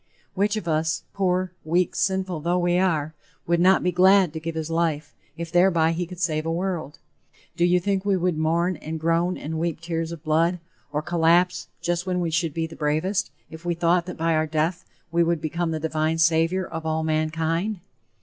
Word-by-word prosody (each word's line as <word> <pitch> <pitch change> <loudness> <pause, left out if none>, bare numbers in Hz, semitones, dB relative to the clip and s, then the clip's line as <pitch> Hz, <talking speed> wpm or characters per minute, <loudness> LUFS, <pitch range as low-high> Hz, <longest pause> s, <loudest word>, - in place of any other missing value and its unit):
Which 200 +2 +1
of 180 - -5
us, 160 0 0
poor, 185 -2 0
weak, 175 +3 +1
sinful 190 -3 0
though 170 +4 0
we 175 0 +2
are, 160 -5 0 0.3
would 170 0 +1
not 185 +2 +4
be 180 - +2
glad 185 -1 +5
to 160 - -4
give 165 +1 -5
his 160 0 -3
life, 160 -3 -1 0.2
if 170 -1 -5
thereby 175 -2 +4
he 170 +1 -2
could 180 0 -10
save 155 -3 0
a 165 - -2
world? 170 -3 -3 0.6
Do 170 - 0
you 180 +1 +4
think 195 +1 -1
we 200 -1 +2
would 180 -1 0
mourn 165 +3 +1
and 160 +1 -6
groan 165 +3 +1
and 160 +2 -4
weep 165 -1 -2
tears 165 -1 -3
of 165 -2 -8
blood, 165 +3 +2 0.3
or 150 +1 -2
collapse, 175 +2 +2
just 175 +1 -1
when 180 -1 0
we 170 -2 -1
should 165 -2 -1
be 165 -1 0
the 160 - -9
bravest, 155 +6 0 0.2
if 160 +1 -10
we 175 -1 -1
thought 170 +1 +2
that 180 - -6
by 165 0 +1
our 155 0 +1
death 160 +4 -1 0.3
we 170 0 +3
would 170 -1 +1
become 170 +2 -2
the 160 -1 -2
divine 155 0 0
Savior 165 +3 +2
of 165 -1 -6
all 160 0 -1
mankind? 160 +5 -1
170 Hz, 205 wpm, -24 LUFS, 160-180 Hz, 0.6 s, glad